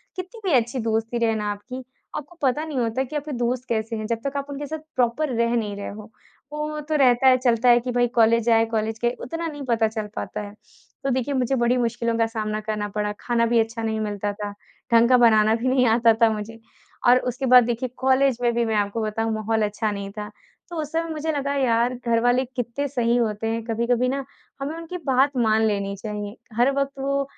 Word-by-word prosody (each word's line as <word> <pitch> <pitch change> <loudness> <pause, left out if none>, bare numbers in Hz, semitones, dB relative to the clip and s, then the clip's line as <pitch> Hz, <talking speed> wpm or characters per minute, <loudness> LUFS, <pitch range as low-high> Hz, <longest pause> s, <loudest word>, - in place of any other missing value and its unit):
कितनी 370 +5 -7
भी - - +2
अच्छी 235 +2 -1
दोस्ती 225 +2 -1
रहे 225 -1 +1
ना 210 -1 -1
आपकी, 250 +6 -7 0.3
आपको 300 +4 -9
पता 285 +3 +1
नहीं 305 -4 -5
होता 235 +2 0
कि 270 +4 -8
आपके 295 0 -3
दोस्त 245 +1 -1
कैसे 225 0 -1
हैं, 215 -1 -4
जब 230 0 -1
तक 275 +1 -3
आप 280 +1 -4
उनके 285 +1 -5
साथ 315 +2 -4 0.2
प्रॉपर 255 +5 +1
रह 235 +1 +1
नहीं 210 -3 -1
रहे 200 - -5
हो। 210 +1 -10 0.4
वो 300 0 -3
तो 310 +1 -2
रहता 260 -2 +4
है, 255 -1 +7
चलता 245 -1 +2
है 240 - +7
कि 250 +1 -4
भई, 245 0 +2
कॉलेज 230 -1 +3
आए, 225 0 +5
कॉलेज 220 0 -2
के 240 - +2
उतना 330 0 -4
नहीं 290 -3 -6
पता 230 -3 +2
चल 215 -1 -4
पाता - - -4
है। 205 0 -8 0.5
तो 275 - 0
देखिए, 260 +2 0
मुझे 260 0 +1
बड़ी 240 +1 +2
मुश्किलों 235 -1 0
का 230 - +3
सामना 215 -1 -3
करना 210 -1 -3
पड़ा, 210 0 0
खाना 235 -1 +1
भी 230 0 +3
अच्छा 225 0 -1
नहीं 220 0 -1
मिलता 205 -1 -2
था, 205 0 -5 0.4
ढंग 230 +1 +6
का 255 - +6
बनाना 220 -2 +5
भी 235 +3 -2
नहीं 255 -1 +3
आता 230 0 +5
था 230 - +7
मुझे। 215 +2 -7 0.5
और 245 +1 +7
उसके 250 +3 -4
बाद 250 -1 +8
देखिए 240 +2 -2
कॉलेज 265 0 +3
में 240 -1 +2
भी 235 0 +1
मैं 220 -1 0
आपको 205 +2 0
बताऊँ, 220 +1 -1
माहौल 220 +1 0
अच्छा 210 +1 -2
नहीं 200 -1 -5
था। 210 0 -5 0.4
तो 345 - -7
उस 300 -1 -6
समय 330 0 -1
मुझे 315 0 -2
लगा, 280 -1 -1
यार, 245 -2 +2
घरवाले 245 +2 +3
कितने 250 +4 -2
सही 240 -3 +1
होते 225 -2 -1
हैं, 225 0 -2
कभी-कभी 235 +2 +1
ना 275 +1 -2 0.4
हमें 290 +3 -3
उनकी 335 +2 -6
बात 270 +1 +2
मान 220 -2 +3
लेनी 200 -1 -1
चाहिए, 210 0 -5 0.2
हर 245 +3 +4
वक़्त 275 0 0
वो 275 +1 0
235 Hz, 225 wpm, -23 LUFS, 220-265 Hz, 0.5 s, बाद